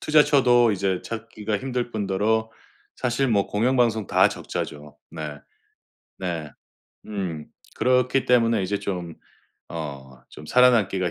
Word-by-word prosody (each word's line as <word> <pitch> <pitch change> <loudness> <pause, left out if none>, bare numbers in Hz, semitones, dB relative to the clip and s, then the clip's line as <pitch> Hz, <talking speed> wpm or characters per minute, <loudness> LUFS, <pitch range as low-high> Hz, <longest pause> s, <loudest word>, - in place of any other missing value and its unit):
투자처도 130 -6 +4
이제 95 -2 -1
찾기가 110 -2 -4
힘들 125 0 -3
뿐더러 110 +2 0 0.5
사실 125 +1 0
뭐 100 -3 +2
공영방송 115 -2 +1
다 - - +4
적자죠. 75 0 -6
네. 75 -3 -6 0.8
네. 85 -5 -4 0.6
음. 90 -7 -4 0.4
그렇기 125 +1 +3
때문에 115 -4 +3
이제 100 +2 -1
좀 90 -4 -4 0.6
어 70 -5 -7
좀 75 - -12
살아남기가 105 -8 +3
105 Hz, 240 characters per minute, -24 LUFS, 90-120 Hz, 0.8 s, 투자처도